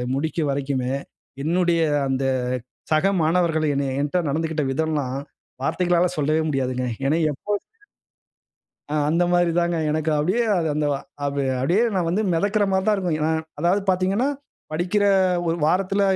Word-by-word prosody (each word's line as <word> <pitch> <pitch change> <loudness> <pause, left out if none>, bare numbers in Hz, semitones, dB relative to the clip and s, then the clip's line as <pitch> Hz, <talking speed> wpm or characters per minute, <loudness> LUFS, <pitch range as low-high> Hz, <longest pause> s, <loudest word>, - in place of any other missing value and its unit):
முடிக்கும் 155 +1 -1
வரைக்குமே, 135 -2 -1 0.5
என்னுடைய 170 +1 +2 0.3
அந்த 135 0 0 0.7
சக 170 +6 +3
மாணவர்கள் 160 -1 +2
என்னைய 135 -1 -1
என்ட 145 +4 -1
நடந்துகிட்ட 160 +1 -1
விதம்லாம் 145 -3 -1 0.5
வார்த்தைகளால 175 +3 +2
சொல்லவே 155 +2 +1
முடியாதுங்க. 130 -3 -1 0.2
ஏன்னா 155 +4 +2
எப்போதும் 205 +8 -3 1.3
ஆ - - 0
அந்தமாரி 175 +1 +2
தாங்க 170 0 +1
எனக்கு 155 +1 0
அப்பிடியே 185 +11 +1 0.3
அந்த 150 -1 0
வ - - 0 0.3
அப் 140 0 -2 0.2
அப்பிடியே 170 - +2
நான் 180 -3 0
வந்து 195 +6 +1
மிதக்கிறமாரி 195 +1 +1
தான் 215 - +3
இருக்கும். 180 -5 -1
ஏனா 155 +1 +1 0.3
அதாவது 175 +4 +2
பார்த்தீங்கன்னா, 190 +7 +1 0.4
படிக்கிற 180 +6 0 0.4
ஒரு 165 0 +1
வாரத்தில 195 +4 +1
165 Hz, 130 wpm, -23 LUFS, 145-180 Hz, 1.3 s, சக